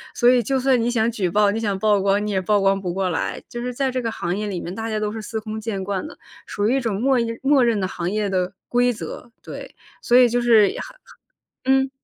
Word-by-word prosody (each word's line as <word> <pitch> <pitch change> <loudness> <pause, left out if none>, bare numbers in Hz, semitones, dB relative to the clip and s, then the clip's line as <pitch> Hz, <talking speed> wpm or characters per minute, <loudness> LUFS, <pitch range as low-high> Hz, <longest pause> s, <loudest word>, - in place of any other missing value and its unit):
所 240 - +4
以 250 -1 +5
就 265 +4 0
算 260 -2 +2
你 235 - 0
想 235 -1 +1
举 195 -6 -1
报、 205 +3 +3
你 220 - -2
想 205 -3 -1
曝 205 0 +2
光， 200 +1 +1
你 210 - -2
也 190 - +1
曝 205 +2 +1
光 195 0 +2
不 180 -2 -3
过 190 0 -1
来。 160 - -3
就 240 - -6
是 250 0 -3
在 265 +1 -1
这 255 0 -2
个 230 - -2
行 180 -3 -3
业 210 0 -3
里 185 -4 -4
面 175 - -6
大 225 +2 -4
家 215 - -2
都 210 0 -2
是 220 0 -6
司 220 +1 -5
空 215 0 -5
见 210 -3 -4
惯 200 +7 -3
的， - - -12 0.3
属 205 +1 -1
于 265 - +2
一 - - +1
种 225 -5 -2
默 265 -1 +3
认 230 0 -2
默 275 -1 +4
认 225 -4 +1
的 185 - 0
行 175 -1 -3
业 210 0 -1
的 185 -1 -1 0.2
规 245 0 +2
则， 235 +2 -8
对， - - -9 0.3
所 240 - +4
以 250 -1 +6
就 245 +1 0
是 225 -4 +5
很 - - -6 0.7
很 265 +1 +4
嗯。 - - -11
220 Hz, 295 characters per minute, -22 LUFS, 200-245 Hz, 0.7 s, 以